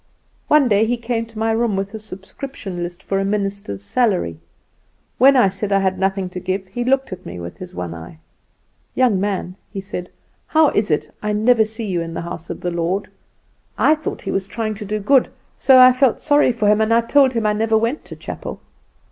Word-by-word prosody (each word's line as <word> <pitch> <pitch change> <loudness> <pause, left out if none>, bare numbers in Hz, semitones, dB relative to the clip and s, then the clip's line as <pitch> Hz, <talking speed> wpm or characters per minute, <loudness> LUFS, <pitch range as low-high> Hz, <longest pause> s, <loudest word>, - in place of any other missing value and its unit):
One 300 -3 +5
day 215 0 +3
he 245 +1 0
came 230 -1 -3
to 225 -1 -15
my 225 +1 +1
room 225 -2 +1
with 195 +1 -3
a 220 - -5
subscription 200 -1 -8
list 175 +1 -6
for 195 - -1
a - - 0
minister's 195 - -3
salary. 180 - 0 0.8
When 270 +3 +7
I 245 -6 +5
said 195 +2 -3
I 195 - +4
had 190 -1 0
nothing 195 0 0
to 180 - -5
give 190 +2 -3
he 210 +6 -4
looked 265 -3 +1
at 185 0 -9
me 90 - -8
with 85 0 -8
his 180 0 -9
one 85 -2 -4
eye. 80 -1 -10 0.8
"'Young 245 -7 +3
man,' 190 -2 -3
he 200 - -5
said, 180 -2 -6 0.4
'how 315 -2 +4
is 210 0 0
it 150 - -1
I 210 0 -1
never 220 +2 +4
see 220 +1 -4
you 180 -4 -1
in 165 0 -6
the - - -3
house 170 -1 -7
of - - -6
the 175 - -2
Lord?' 175 +4 -2 0.7
I 305 - +5
thought 310 -1 -5
he - - -3
was 195 0 -2
trying 215 +1 -3
to 210 0 -8
do 210 +1 -2
good, 260 +5 +3 0.3
so 265 -1 +5
I 255 0 +9
felt 255 -1 +2
sorry 290 -3 +3
for 230 -3 -1
him, 210 +1 +4
and 220 +1 +1
I 230 +1 +5
told 265 +2 +3
him 230 -2 -1
I 210 - +3
never 220 +1 +2
went 230 +7 -1
to - - -9
chapel. - - -7
210 Hz, 225 wpm, -20 LUFS, 185-235 Hz, 0.8 s, I